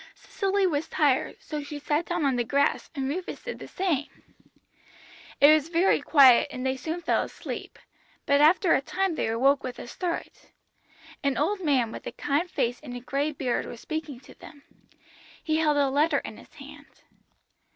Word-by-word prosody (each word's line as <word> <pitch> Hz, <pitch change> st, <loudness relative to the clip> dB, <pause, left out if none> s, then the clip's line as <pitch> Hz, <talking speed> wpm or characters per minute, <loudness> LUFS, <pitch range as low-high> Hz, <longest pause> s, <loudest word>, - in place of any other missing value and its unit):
Cicely 395 Hz, -1 st, -1 dB
was 315 Hz, -3 st, -1 dB
tired, 285 Hz, -4 st, +1 dB
so 300 Hz, -1 st, -5 dB
she 290 Hz, +1 st, -7 dB
sat 295 Hz, +3 st, -1 dB
down 345 Hz, -3 st, -1 dB
on 270 Hz, -2 st, +2 dB
the 240 Hz, -, +1 dB
grass, 280 Hz, +4 st, 0 dB
and 270 Hz, -2 st, -2 dB
Rufus 350 Hz, +6 st, -5 dB
did -, -, -6 dB
the -, -, -9 dB
same. 330 Hz, -7 st, -1 dB, 1.3 s
It 290 Hz, +2 st, +8 dB
was 310 Hz, 0 st, +1 dB
very 345 Hz, +3 st, +2 dB
quiet, 270 Hz, -6 st, +6 dB
and 255 Hz, -2 st, -6 dB
they 260 Hz, 0 st, 0 dB
soon 320 Hz, +6 st, -5 dB
fell -, -, +2 dB
asleep, -, -, -7 dB, 0.5 s
but 280 Hz, 0 st, +3 dB
after 330 Hz, +3 st, +5 dB
a -, -, +2 dB
time 370 Hz, +5 st, -1 dB
they -, -, -2 dB
awoke 270 Hz, +5 st, +2 dB
with 255 Hz, -1 st, -6 dB
a -, -, -8 dB
start. 340 Hz, +8 st, -5 dB, 0.8 s
An 280 Hz, -1 st, 0 dB
old 380 Hz, +7 st, 0 dB
man 260 Hz, -7 st, +2 dB
with -, -, -8 dB
a -, -, -4 dB
kind 300 Hz, +5 st, -1 dB
face 245 Hz, -6 st, -1 dB
and 255 Hz, -5 st, -8 dB
a -, -, -5 dB
grey 280 Hz, +4 st, -2 dB
beard 260 Hz, -4 st, -2 dB
was 235 Hz, -, -9 dB
speaking 310 Hz, -3 st, -5 dB
to 255 Hz, -, -15 dB
them. 285 Hz, -3 st, -15 dB, 0.8 s
He 315 Hz, -1 st, 0 dB
held 305 Hz, -2 st, +2 dB
a 285 Hz, -1 st, +3 dB
letter 290 Hz, +4 st, +2 dB
in -, -, -6 dB
his -, -, -17 dB
hand. -, -, -14 dB
290 Hz, 185 wpm, -26 LUFS, 270-330 Hz, 1.3 s, It